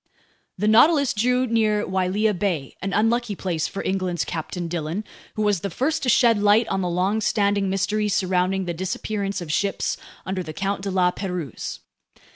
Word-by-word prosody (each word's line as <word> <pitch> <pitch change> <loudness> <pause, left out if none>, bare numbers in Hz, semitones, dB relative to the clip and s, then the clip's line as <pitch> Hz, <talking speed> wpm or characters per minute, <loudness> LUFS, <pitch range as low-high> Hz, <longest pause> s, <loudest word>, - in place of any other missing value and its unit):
The 210 +3 0
Nautilus 280 +5 +5
drew 250 +4 +2
near 215 -3 +1
Wailea 190 +3 +1
Bay, 175 -8 -2
an 195 +2 -2
unlucky 225 +1 +1
place 175 -5 -2
for 195 - -5
England's 185 -3 -1
Captain 165 +2 -4
Dillon, 165 +4 -3 0.3
who 215 - -1
was 205 -3 +2
the 200 - -3
first 275 - -1
to 255 - 0
shed 230 -2 +4
light 210 +3 +4
on 190 - 0
the 180 - -1
longstanding 200 +2 +1
mystery 210 +2 0
surrounding 185 0 +1
the 175 - -2
disappearance 195 +3 -3
of 165 -3 -5
ships 200 +2 0 0.3
under 190 0 -2
the 160 -3 -7
Count 195 +3 -2
de 200 - -3
La 185 -1 +2
Pérouse. 180 - -5
195 Hz, 170 wpm, -23 LUFS, 180-215 Hz, 0.3 s, Nautilus